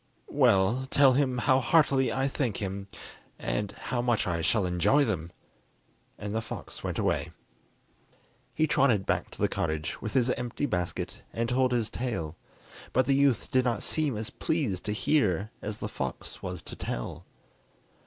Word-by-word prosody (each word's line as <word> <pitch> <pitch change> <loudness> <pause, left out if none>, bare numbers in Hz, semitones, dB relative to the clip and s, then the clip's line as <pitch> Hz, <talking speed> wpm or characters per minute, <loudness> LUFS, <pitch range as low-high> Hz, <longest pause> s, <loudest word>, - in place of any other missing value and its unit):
"Well, 100 +7 +3
tell 135 -2 +6
him 130 -1 +2
how 130 +2 +4
heartily 135 -2 +3
I 135 +1 +1
thank 130 -6 -1
him, 100 0 -4 0.5
and 105 -1 -2
how 120 +3 -3
much 120 -2 +1
I 85 -2 -1
shall 95 +4 +2
enjoy 90 +12 +3
them." 85 -6 -2 0.9
And 105 0 -5
the 110 - 0
fox 115 - -8
went - - -2
away. - - 0 1.2
He 155 - +3
trotted 125 -9 +3
back - - 0
to - - -13
the - - +3
cottage 80 0 -2
with 110 - -4
his 125 -2 +3
empty 125 +3 -2
basket 90 -9 -3
and 115 +1 -1
told 130 0 +2
his 120 -3 0
tale, 110 -11 -3 0.6
but 130 +1 +3
the 135 - +3
youth 135 -5 +2
did 130 -2 +4
not 120 -4 0
seem 150 -7 0
as 110 0 -4
pleased 130 - -1
to 105 - -1
hear 105 - +1
as 105 0 -4
the - - -4
fox - - -5
was - - -5
to - - -6
tell. - - -5
120 Hz, 165 wpm, -29 LUFS, 100-130 Hz, 1.2 s, tell